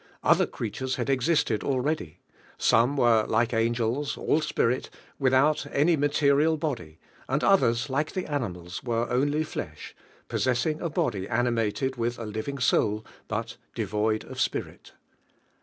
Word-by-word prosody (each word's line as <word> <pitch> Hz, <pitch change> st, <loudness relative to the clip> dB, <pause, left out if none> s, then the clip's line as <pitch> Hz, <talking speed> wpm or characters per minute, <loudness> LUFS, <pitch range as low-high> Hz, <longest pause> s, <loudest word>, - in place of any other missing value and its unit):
Other -, -, +4 dB
creatures 130 Hz, +4 st, -4 dB
had -, -, -1 dB
existed 130 Hz, -4 st, +1 dB
already, 135 Hz, -, -1 dB, 0.4 s
some 125 Hz, +6 st, +3 dB
were 115 Hz, -4 st, +4 dB
like 115 Hz, +2 st, +1 dB
angels, 115 Hz, +4 st, 0 dB
ail 160 Hz, -, +1 dB
spirit, 130 Hz, -4 st, 0 dB, 0.3 s
without 140 Hz, +3 st, +3 dB
any 160 Hz, +4 st, +3 dB
material 145 Hz, +1 st, +3 dB
body, 120 Hz, -, -4 dB, 0.3 s
and 140 Hz, +4 st, 0 dB
others,. 125 Hz, -11 st, +3 dB
like 150 Hz, +3 st, -1 dB
the 185 Hz, -, -2 dB
animals, 90 Hz, -, -4 dB
were 120 Hz, -2 st, 0 dB
only 145 Hz, +5 st, +1 dB
flesh, 75 Hz, -, -7 dB, 0.3 s
possess 125 Hz, -2 st, 0 dB
ing 155 Hz, -1 st, -1 dB
a 170 Hz, -, -1 dB
body 125 Hz, -, -1 dB
animated 120 Hz, +2 st, 0 dB
with 120 Hz, +1 st, -1 dB
a 115 Hz, -, -6 dB
living 110 Hz, +6 st, -4 dB
soul, 110 Hz, -4 st, +1 dB, 0.2 s
but 115 Hz, +2 st, -4 dB, 0.2 s
devoid 110 Hz, 0 st, 0 dB
of -, -, -6 dB
spirit. -, -, -3 dB
125 Hz, 140 wpm, -27 LUFS, 115-145 Hz, 0.4 s, Other